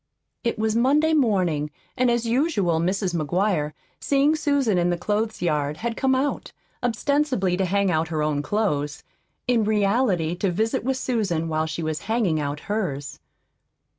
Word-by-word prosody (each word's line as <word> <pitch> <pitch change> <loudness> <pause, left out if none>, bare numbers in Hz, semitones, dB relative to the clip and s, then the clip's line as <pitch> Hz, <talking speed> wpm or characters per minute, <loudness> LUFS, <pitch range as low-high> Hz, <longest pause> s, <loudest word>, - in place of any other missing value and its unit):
It 235 -1 -1
was 220 0 0
Monday 290 +7 +3
morning, 185 - +2 0.3
and 255 -1 +2
as 235 0 +1
usual 230 - +1
Mrs. 185 +2 0
McGuire, 170 -1 0 0.3
seeing 285 +2 +2
Susan 285 - +1
in 175 0 +2
the 175 - 0
clothes 215 +3 -2
yard, 150 -3 0
had 230 +3 -3
come 265 +2 +2
out, 275 +2 -2 0.3
ostensibly 250 -5 +1
to 190 +1 0
hang 200 +1 +1
out 160 0 +1
her 155 -2 -1
own 150 -1 0
clothes, 150 -6 -1 0.4
in 240 -3 +3
reality 205 -5 +1
to 195 - 0
visit 220 +7 0
with 260 +1 0
Susan 200 -11 -1
while 155 0 0
she 160 +1 -4
was 155 -1 -2
hanging 210 -9 +1
out 145 0 -3
hers. 185 -10 -3
200 Hz, 160 wpm, -24 LUFS, 160-240 Hz, 0.4 s, Monday